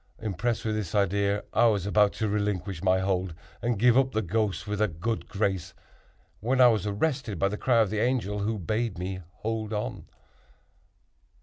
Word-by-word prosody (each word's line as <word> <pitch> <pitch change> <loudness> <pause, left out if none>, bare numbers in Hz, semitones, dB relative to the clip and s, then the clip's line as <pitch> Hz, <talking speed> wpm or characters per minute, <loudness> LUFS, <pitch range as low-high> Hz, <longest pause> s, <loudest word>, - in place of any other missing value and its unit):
Impressed 110 +3 -2
with 110 - 0
this 105 -3 -3
idea, 100 +1 +1
I 120 +2 +5
was 100 -4 +1
about 105 0 +4
to 110 - -1
relinquish 100 -3 -2
my 95 -1 +3
hold 95 -3 -1 0.3
and 120 -2 0
give 120 +3 +5
up 130 0 +3
the 110 - 0
ghost 100 +1 -1
with 105 0 -3
a 110 - +4
good 95 +7 -3
grace, 95 -3 -2 0.6
when 125 +5 0
I 125 -1 +8
was 105 -3 0
arrested 110 - -1
by 100 +4 +2
the 105 - -3
cry 120 -3 +3
of 105 -3 +1
the 110 - -1
Angel, 110 -4 0
who 110 +2 -1
bade 110 +2 -2
me 95 +1 -4 0.2
hold 110 -1 -2
on. 105 0 -4
105 Hz, 185 wpm, -27 LUFS, 95-115 Hz, 0.6 s, I